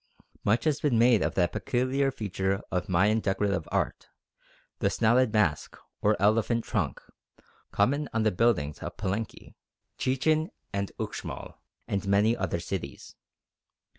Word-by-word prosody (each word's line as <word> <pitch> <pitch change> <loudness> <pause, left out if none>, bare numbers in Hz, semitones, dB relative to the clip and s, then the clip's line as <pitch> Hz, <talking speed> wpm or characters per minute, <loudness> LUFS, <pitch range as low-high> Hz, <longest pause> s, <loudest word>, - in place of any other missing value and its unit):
Much 110 +3 +2
has 155 -2 +1
been 140 -6 +2
made 115 -2 +5
of - - -1
that 90 -2 +2
peculiar 130 +2 0
feature 95 -5 -2
of 90 0 -2
Mayan 100 +5 +3
decorative 100 -4 -1
art, - - -1 0.7
the - - +2
"snouted 120 +1 +3
mask" 105 -9 +1 0.2
or 105 +1 +2
"elephant 115 +3 +2
trunk," - - -2 0.7
common 140 +9 +1
on 110 0 0
the 110 - +3
buildings 90 -9 +1
of - - -7
Palenque, 100 +2 -4 0.5
Chichen 155 +5 +1 0.2
and 100 0 -2
Uxmal, - - -6 0.3
and 100 -1 -2
many 105 +4 +3
other 95 -5 -2
cities. 85 -6 -6
105 Hz, 135 wpm, -28 LUFS, 95-120 Hz, 0.7 s, made